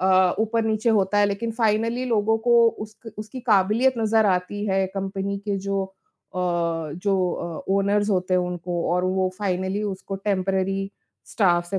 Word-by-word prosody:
अ, 185 Hz, -1 st, +4 dB
ऊपर-नीचे 220 Hz, 0 st, +1 dB
होता 205 Hz, -1 st, +2 dB
है 205 Hz, -, +5 dB
लेकिन 205 Hz, +3 st, -2 dB
फाइनली 230 Hz, +2 st, 0 dB
लोगों 225 Hz, -1 st, +2 dB
को 235 Hz, -1 st, +6 dB
उसक 215 Hz, 0 st, -9 dB
उसकी 215 Hz, +4 st, -7 dB
काबिलियत 215 Hz, +6 st, +3 dB
नज़र 220 Hz, -1 st, +3 dB
आती 190 Hz, +2 st, 0 dB
है 190 Hz, -1 st, +1 dB
कंपनी 195 Hz, 0 st, -3 dB
के 200 Hz, -, +1 dB
जो 195 Hz, 0 st, -1 dB
अ, 190 Hz, 0 st, -19 dB
जो 175 Hz, +1 st, 0 dB
अ, 170 Hz, -2 st, -5 dB
ओनर्स 205 Hz, +1 st, +2 dB
होते 185 Hz, -1 st, +1 dB
हैं 180 Hz, -, +3 dB
उनको 175 Hz, -1 st, -3 dB
और 180 Hz, 0 st, +1 dB
वो 185 Hz, 0 st, +1 dB
फाइनली 190 Hz, 0 st, -1 dB
उसको 195 Hz, 0 st, -4 dB
टेम्पररी 195 Hz, 0 st, -1 dB, 0.4 s
स्टाफ़ 175 Hz, -5 st, +2 dB
से 195 Hz, -, 0 dB
195 Hz, 160 wpm, -24 LUFS, 185-215 Hz, 0.4 s, को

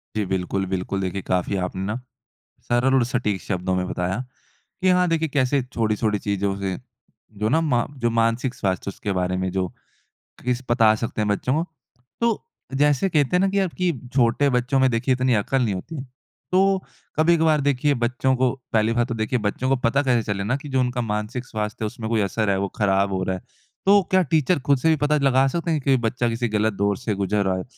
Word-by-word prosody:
जी 105 Hz, -, 0 dB
बिल्कुल, 95 Hz, +1 st, -1 dB
बिल्कुल। 95 Hz, +1 st, -2 dB
देखिए 95 Hz, +1 st, -2 dB
काफ़ी 90 Hz, +2 st, -1 dB
आपने 95 Hz, +1 st, -5 dB
ना 110 Hz, +3 st, -2 dB, 0.7 s
सरल 120 Hz, +2 st, +1 dB
और 130 Hz, -, +4 dB
सटीक 115 Hz, -6 st, -1 dB
शब्दों 95 Hz, -1 st, -2 dB
में 90 Hz, 0 st, -1 dB
बताया 90 Hz, +4 st, -2 dB, 0.6 s
कि 185 Hz, -, +3 dB
हाँ 180 Hz, 0 st, +4 dB
देखिए 160 Hz, -1 st, 0 dB
कैसे 140 Hz, 0 st, +1 dB
छोटी-छोटी 110 Hz, -3 st, -1 dB
चीजों 100 Hz, -1 st, -1 dB
से 95 Hz, -2 st, -2 dB, 0.6 s
जो 110 Hz, -, +2 dB
ना 160 Hz, +7 st, +3 dB
मा 125 Hz, -7 st, +1 dB
जो 120 Hz, -2 st, +1 dB
मानसिक 115 Hz, +3 st, +1 dB
स्वास्थ्य 95 Hz, 0 st, -2 dB
उसके 100 Hz, -, -4 dB
बारे 90 Hz, 0 st, 0 dB
में 95 Hz, 0 st, -1 dB
जो 95 Hz, -1 st, -1 dB, 0.8 s
किस 125 Hz, 0 st, 0 dB
पता 115 Hz, -2 st, +5 dB
सकते 115 Hz, -1 st, -2 dB
हैं 105 Hz, -, 0 dB
बच्चों 125 Hz, +5 st, 0 dB
को। 160 Hz, +3 st, 0 dB, 0.6 s
तो 230 Hz, -2 st, +1 dB, 0.3 s
जैसे 145 Hz, +6 st, +3 dB
कहते 150 Hz, -1 st, +2 dB
हैं -, -, +1 dB
ना 195 Hz, -, +3 dB
कि 200 Hz, +1 st, +1 dB
अब 185 Hz, -4 st, 0 dB
कि 180 Hz, -1 st, +2 dB, 0.2 s
छोटे 125 Hz, +2 st, +3 dB
बच्चों 125 Hz, +2 st, +1 dB
में 130 Hz, -1 st, +4 dB
देखिए 120 Hz, +3 st, +1 dB
इतनी 130 Hz, -1 st, +1 dB
अकल 135 Hz, +5 st, 0 dB
नहीं 110 Hz, -4 st, 0 dB
होती 125 Hz, -, -7 dB
है। 135 Hz, -, -5 dB, 0.5 s
तो 190 Hz, +1 st, +3 dB, 0.4 s
कभी-कभार 160 Hz, -2 st, +4 dB
देखिए 145 Hz, +1 st, +2 dB
बच्चों 130 Hz, +2 st, +1 dB
को 130 Hz, 0 st, +2 dB, 0.2 s
पहली 110 Hz, +1 st, +3 dB
बात 120 Hz, 0 st, +1 dB
तो 120 Hz, -, -2 dB
देखिए 110 Hz, +3 st, -1 dB
बच्चों 110 Hz, +5 st, -1 dB
को 135 Hz, -, +4 dB
पता 125 Hz, +5 st, +3 dB
कैसे 125 Hz, -4 st, +2 dB
चले 100 Hz, 0 st, -3 dB
ना 120 Hz, +6 st, 0 dB
कि 145 Hz, +1 st, -10 dB
जो 130 Hz, -1 st, +1 dB
उनका 125 Hz, -1 st, 0 dB
मानसिक 110 Hz, +3 st, -3 dB
स्वास्थ्य 105 Hz, 0 st, -4 dB
है -, -, 0 dB
उसमें 115 Hz, -1 st, -6 dB
कोई 110 Hz, -2 st, +2 dB
असर 100 Hz, +2 st, 0 dB
है 95 Hz, -, +2 dB
वो 100 Hz, -, 0 dB
खराब 100 Hz, -1 st, +2 dB
हो 95 Hz, -, -1 dB
रहा 95 Hz, 0 st, -1 dB
है। 90 Hz, -, -8 dB, 0.4 s
तो 200 Hz, +1 st, +6 dB
क्या 185 Hz, 0 st, +5 dB
टीचर 155 Hz, +1 st, +3 dB
ख़ुद 140 Hz, -1 st, +5 dB
से 160 Hz, -, +2 dB
भी 160 Hz, -, +5 dB
पता 150 Hz, +1 st, +3 dB
लगा 135 Hz, 0 st, +4 dB
सकते 170 Hz, +4 st, -2 dB
हैं 155 Hz, -, 0 dB
कि 135 Hz, 0 st, +3 dB
बच्चा 120 Hz, +1 st, 0 dB
किसी 115 Hz, +1 st, -1 dB
गलत 110 Hz, 0 st, +1 dB
दौर 100 Hz, 0 st, 0 dB
से 105 Hz, 0 st, -2 dB
गुज़र 100 Hz, +1 st, 0 dB
रहा 95 Hz, -1 st, +1 dB
है? 95 Hz, -, -3 dB
120 Hz, 220 wpm, -23 LUFS, 100-135 Hz, 0.8 s, तो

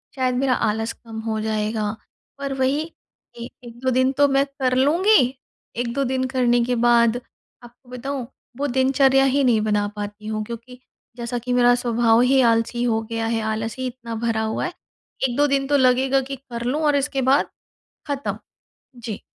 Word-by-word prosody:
शायद 255 Hz, -2 st, 0 dB
मेरा 260 Hz, 0 st, +2 dB
आलस 225 Hz, 0 st, -1 dB
कम 225 Hz, -2 st, -10 dB
हो 220 Hz, -1 st, -1 dB
जाएगा। 215 Hz, -1 st, -1 dB, 0.5 s
पर 275 Hz, -1 st, -4 dB
वही, 270 Hz, +4 st, +1 dB, 0.5 s
ए 235 Hz, 0 st, -6 dB, 0.2 s
एक, 240 Hz, -1 st, -12 dB
2 260 Hz, -, +2 dB
दिन 260 Hz, +1 st, +2 dB
तो 285 Hz, 0 st, +5 dB
मैं 275 Hz, 0 st, +2 dB
कर 270 Hz, -2 st, -1 dB
लूँगी, 290 Hz, -, +3 dB, 0.4 s
1-2 245 Hz, +3 st, -1 dB
दिन 260 Hz, 0 st, 0 dB
करने 245 Hz, -1 st, +3 dB
के 250 Hz, 0 st, 0 dB
बाद, 235 Hz, 0 st, +3 dB, 0.5 s
आपको 240 Hz, +1 st, -17 dB
बताऊँ, 250 Hz, 0 st, -5 dB, 0.3 s
वो 285 Hz, +1 st, -1 dB
दिनचर्या 265 Hz, +1 st, +3 dB
ही 280 Hz, 0 st, +2 dB
नहीं 235 Hz, -4 st, +3 dB
बना 210 Hz, -1 st, +1 dB
पाती 205 Hz, +1 st, -7 dB
हूँ, 215 Hz, 0 st, -2 dB
क्योंकि 235 Hz, +2 st, -9 dB, 0.4 s
जैसा 235 Hz, +1 st, -3 dB
कि 245 Hz, +1 st, -3 dB
मेरा 245 Hz, 0 st, +5 dB
स्वभाव 235 Hz, -1 st, +2 dB
ही 260 Hz, +1 st, +4 dB
आलसी 230 Hz, +1 st, 0 dB
हो 225 Hz, -2 st, +1 dB
गया 225 Hz, 0 st, -2 dB
है, 225 Hz, 0 st, -1 dB
आलस 220 Hz, +1 st, -3 dB
ही 260 Hz, -, -2 dB
इतना 240 Hz, -2 st, -7 dB
भरा 225 Hz, -1 st, 0 dB
हुआ 220 Hz, 0 st, -2 dB
है। 355 Hz, -, -4 dB, 0.5 s
1-2 285 Hz, +4 st, +1 dB
दिन 275 Hz, -1 st, 0 dB
तो 285 Hz, -, +3 dB
लगेगा 260 Hz, +1 st, +3 dB
कि 275 Hz, -, -3 dB
कर 240 Hz, -3 st, -8 dB
लूँ, 285 Hz, +6 st, 0 dB
और 295 Hz, -1 st, +3 dB
इसके 275 Hz, -1 st, 0 dB
बाद 280 Hz, -, +3 dB, 0.6 s
ख़त्म। 285 Hz, 0 st, -3 dB, 0.6 s
जी। 230 Hz, -3 st, -6 dB
245 Hz, 180 wpm, -22 LUFS, 230-270 Hz, 0.6 s, तो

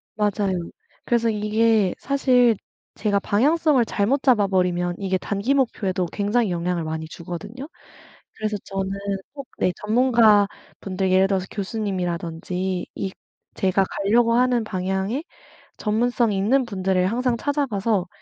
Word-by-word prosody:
맞아요. 205 Hz, -2 st, 0 dB, 0.5 s
그래서 235 Hz, -1 st, +2 dB
이게 215 Hz, -2 st, +2 dB
사실 250 Hz, -4 st, +3 dB, 0.4 s
제가 205 Hz, -1 st, +1 dB
방향성을 285 Hz, +6 st, +3 dB
잘못 225 Hz, +7 st, 0 dB
잡아버리면 185 Hz, -8 st, +2 dB
이게 190 Hz, -1 st, 0 dB
단기 205 Hz, +8 st, -1 dB
목표에도 195 Hz, -8 st, 0 dB
굉장히 210 Hz, +1 st, 0 dB
영향을 175 Hz, 0 st, -1 dB
많이 160 Hz, 0 st, -4 dB
주거든요. 195 Hz, -, -8 dB, 0.7 s
그래서 215 Hz, -1 st, -2 dB
저는 195 Hz, 0 st, -3 dB, 0.4 s
꼭 275 Hz, -2 st, -8 dB
네 180 Hz, -, +2 dB
전문가분들 210 Hz, -5 st, +2 dB
예를 190 Hz, +1 st, +5 dB
들어서 190 Hz, -1 st, -1 dB
교수님이라든지 185 Hz, -3 st, -3 dB
이 195 Hz, -1 st, -4 dB, 0.4 s
제가 190 Hz, 0 st, +2 dB
가려고 230 Hz, +4 st, +2 dB
하는 245 Hz, -1 st, +3 dB
방향에 190 Hz, -, -2 dB, 0.5 s
전문성이 230 Hz, 0 st, +1 dB
있는 255 Hz, +7 st, +2 dB
분들을 190 Hz, -4 st, 0 dB
항상 235 Hz, +4 st, 0 dB
찾아가서 225 Hz, -10 st, 0 dB
205 Hz, 305 characters per minute, -23 LUFS, 190-235 Hz, 0.7 s, 예를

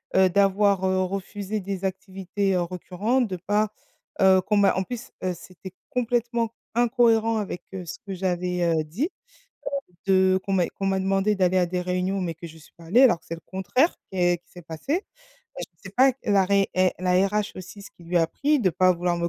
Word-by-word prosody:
heu, 190 Hz, -1 st, +5 dB
d'avoir, 195 Hz, 0 st, +3 dB
heu, 185 Hz, 0 st, +2 dB
refusé 195 Hz, +2 st, -4 dB
des 195 Hz, 0 st, -5 dB
activités 190 Hz, 0 st, -2 dB
récurrentes, 185 Hz, +8 st, -1 dB
de 185 Hz, -2 st, -4 dB
pas 205 Hz, +4 st, 0 dB, 0.5 s
heu, 190 Hz, -1 st, +6 dB
qu'on 205 Hz, +2 st, 0 dB
m'a 200 Hz, -1 st, +5 dB
en 190 Hz, -, 0 dB
plus, 240 Hz, +3 st, -7 dB
heu, 185 Hz, -1 st, 0 dB
c'était 185 Hz, +1 st, -12 dB, 0.2 s
complètement 235 Hz, -2 st, -1 dB, 0.2 s
incohérent 230 Hz, -2 st, +3 dB
avec, 195 Hz, -4 st, -4 dB
heu, 185 Hz, -2 st, -6 dB
ce -, -, -7 dB
que 195 Hz, -, -5 dB
j'avais, 180 Hz, -1 st, -1 dB
heu, 165 Hz, -2 st, +2 dB
dit, 215 Hz, -, -2 dB, 1.0 s
de 190 Hz, 0 st, +4 dB
qu'on 195 Hz, -, -1 dB
m'a 180 Hz, -2 st, +3 dB
qu'on 195 Hz, -, -6 dB
m'a 190 Hz, 0 st, +1 dB
demandé 195 Hz, +2 st, +1 dB
d'aller 185 Hz, -1 st, +2 dB
à 180 Hz, -, +3 dB
des 180 Hz, +1 st, -2 dB
réunions 185 Hz, +2 st, -1 dB
mais 170 Hz, -2 st, -2 dB
que 170 Hz, +1 st, -9 dB
j'y 160 Hz, 0 st, -14 dB
suis 155 Hz, -, -19 dB
pas 165 Hz, -, -14 dB
allée 225 Hz, +10 st, +4 dB
alors 200 Hz, -10 st, +5 dB
que -, -, -28 dB
c'est 165 Hz, -, -4 dB
le 165 Hz, -, -14 dB
contraire 190 Hz, -, +1 dB, 0.2 s
qu'est 175 Hz, -2 st, +1 dB
qui -, -, -31 dB
s'est 175 Hz, -, -11 dB
passé. 275 Hz, -, -3 dB, 0.6 s
Je -, -, -3 dB, 0.2 s
sais 195 Hz, -, -8 dB
pas 260 Hz, +1 st, +6 dB
la 200 Hz, -3 st, +3 dB
ré 200 Hz, 0 st, +2 dB
eh 185 Hz, -1 st, +3 dB
la 180 Hz, 0 st, 0 dB, 0.2 s
RH 210 Hz, +1 st, -1 dB
aussi, 185 Hz, +2 st, -9 dB
ce -, -, -12 dB
qui 175 Hz, -, -19 dB
lui 175 Hz, +1 st, -2 dB
a -, -, +4 dB
a -, -, +2 dB
pris 290 Hz, -, +1 dB
de 190 Hz, -, +3 dB
pas 185 Hz, +2 st, +4 dB
vouloir 175 Hz, 0 st, -1 dB
me 170 Hz, 0 st, -1 dB
190 Hz, 215 wpm, -25 LUFS, 180-210 Hz, 1.0 s, heu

